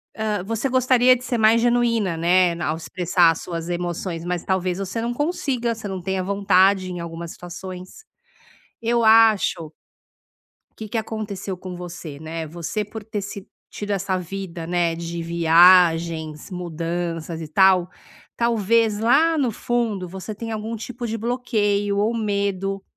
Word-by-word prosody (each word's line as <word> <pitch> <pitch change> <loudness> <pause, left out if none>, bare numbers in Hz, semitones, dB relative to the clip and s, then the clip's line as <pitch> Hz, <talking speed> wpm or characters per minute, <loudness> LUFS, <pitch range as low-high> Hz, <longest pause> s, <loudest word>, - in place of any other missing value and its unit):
hã, 210 -3 -2
você 225 +6 -2
gostaria 255 0 +4
de 250 - -8
ser 245 -2 -2
mais 220 +1 +5
genuína, 230 -6 +2
né, 175 +2 +3
ao 160 -1 -1
expressar 175 0 +2
suas 165 +1 -6
emoções, 175 -1 -3
mas 175 -1 -3
talvez 185 -1 0
você 195 +4 -3
não 240 +1 -2
consiga, 265 -6 -1
você 220 -2 -7
não 190 -1 -4
tenha 190 +1 -2
vontade 195 -1 +3
em 175 - -5
algumas 170 0 -6
situações, 185 - -9 0.8
eu 235 0 +1
acho 220 -7 +4 1.1
que 220 - -7
que 225 - -2
aconteceu 210 -3 -5
com 180 0 -8
você, 170 -4 -8
né, 160 +1 -5
você 170 +6 -4
por 210 +1 -9
ter 215 -1 -4
se 195 0 -7 0.2
tido 205 0 -6
essa 195 -1 -1
vida, 180 -2 -6
né, 175 -1 +1
de 170 0 -5
viagens, 165 -1 +4
mudanças 170 -1 -4
e 160 - -5
tal, 185 +2 +4 0.5
talvez 230 -2 +2
lá 310 +9 +3
no 255 -5 +1
fundo 220 -5 -2
você 190 +4 -7
tenha 225 +1 -5
algum 220 +1 -4
tipo 240 +2 -6
de 225 0 -3
bloqueio 210 -4 0
ou 220 +3 +1
medo 200 -2 -1
195 Hz, 150 wpm, -22 LUFS, 175-225 Hz, 1.1 s, mais